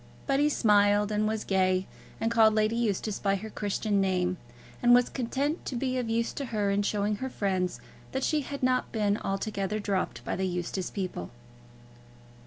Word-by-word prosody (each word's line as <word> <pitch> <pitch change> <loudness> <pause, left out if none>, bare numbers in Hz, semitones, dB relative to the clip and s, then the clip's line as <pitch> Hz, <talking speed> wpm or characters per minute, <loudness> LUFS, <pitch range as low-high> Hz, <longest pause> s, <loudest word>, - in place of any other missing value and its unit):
But 275 -1 +1
he 295 +1 +4
smiled, 205 -4 +3
and 210 0 +1
was 220 0 -1
gay, 185 -1 +2 0.3
and 225 - 0
called 220 -2 +5
Lady 215 +1 +2
Eustace 215 -2 -1
by 195 -1 +1
her 215 +3 -6
Christian 205 0 0
name, 185 -1 +1 0.4
and 245 0 +7
was 245 0 +3
content 275 +5 -2
to 260 - -3
be 255 +1 -1
of 240 -2 -3
use 230 +1 0
to 280 - -4
her 210 -4 0
in 200 +1 +2
showing 205 0 0
her 260 +3 -4
friends 185 -6 -1 0.3
that 265 0 -2
she 305 -2 +1
had 280 0 -6
not 255 0 +1
been 210 -2 +1
altogether 195 +1 -2
dropped 200 -2 -2
by - - -1
the 190 0 -1
Eustace 180 +1 -3
people. 185 - -4
210 Hz, 185 wpm, -28 LUFS, 195-240 Hz, 0.4 s, and